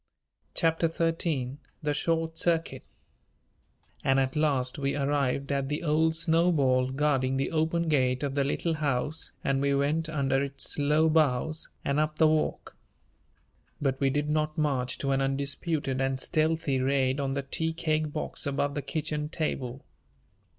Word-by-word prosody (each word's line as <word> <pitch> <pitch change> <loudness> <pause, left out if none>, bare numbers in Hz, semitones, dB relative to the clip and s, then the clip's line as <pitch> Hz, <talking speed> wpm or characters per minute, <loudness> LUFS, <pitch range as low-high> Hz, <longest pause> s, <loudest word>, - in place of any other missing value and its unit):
CHAPTER 165 0 +2
XIII 165 -5 -1 0.3
THE 150 0 +1
SHORT 165 +2 -1
CIRCUIT 165 0 0 1.2
And 135 0 +3
at 130 +1 0
last 140 -3 +1
we 140 0 0
arrived 140 -1 0
at 140 -1 -1
the 150 +3 -2
old 160 +1 +2
snowball 160 -7 +3
guarding 135 -1 +1
the 135 - -1
open 165 +1 0
gate 130 -3 +2
of 140 -1 -1
the 140 0 +1
Little 165 +4 -1
House 150 0 -1
and 135 0 +1
we 140 0 +2
went 150 +3 0
under 135 -3 +1
its 140 +1 -2
low 150 +2 +3
boughs 155 0 +1 0.2
and 140 +1 +1
up 155 0 0
the 160 - +5
walk. 155 0 -1 1.0
But 135 -2 0
we 135 - +3
did 145 +2 -1
not 155 +1 0
march 135 -5 0
to 140 - -1
an 135 0 +2
undisputed 135 0 -1
and 135 0 0
stealthy 155 -2 0
raid 135 0 +1
on 135 -1 -1
the 140 0 -2
tea 160 +4 -1
cake 155 -2 -1
box 150 -1 -3
above 140 0 0
the 145 - -2
kitchen 150 +1 -3
table. 135 -5 -3
145 Hz, 155 wpm, -28 LUFS, 135-155 Hz, 1.2 s, the